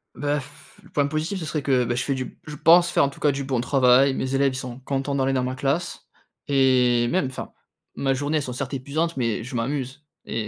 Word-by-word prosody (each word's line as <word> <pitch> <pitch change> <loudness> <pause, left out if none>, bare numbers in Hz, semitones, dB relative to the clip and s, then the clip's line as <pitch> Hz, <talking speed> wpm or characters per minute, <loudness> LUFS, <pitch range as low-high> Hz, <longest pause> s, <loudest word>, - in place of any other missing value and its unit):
Bah, 145 0 -1
pfff, 145 +2 -14
le - - -18
point 145 -1 +1
positif, 155 +6 -2
ce 160 - -5
serait 150 0 -2
que, 130 -3 +2
bah, 120 +1 -1
je 125 - 0
fais 140 - -1
du 130 -1 -5
je 150 -1 -7
pense 175 +3 +6
faire, - - +3
en - - -1
tout - - -15
cas 145 - +4
du 140 0 -4
bon 130 -3 0
travail. 130 +1 +4
Mes 130 +1 -2
élèves, 135 -1 +2
ils - - -5
sont 125 -1 -6
contents 135 +1 -2
d'aller 135 0 +1
dans 130 -1 0
ma 130 +1 -2
classe 140 +6 -2 0.4
et 125 -3 +3
même 175 -7 +1
enfin, 130 - -7 0.4
ma 135 -1 0
journée, 145 +3 -1
elles 145 - -1
sont 125 - -5
certes 135 +2 -4
épuisantes, 155 +6 -2
mais 115 -3 -1
je 125 +1 -7
m'amuse 130 +3 -3 0.2
et 110 -1 -3
135 Hz, 245 wpm, -24 LUFS, 130-145 Hz, 0.4 s, pense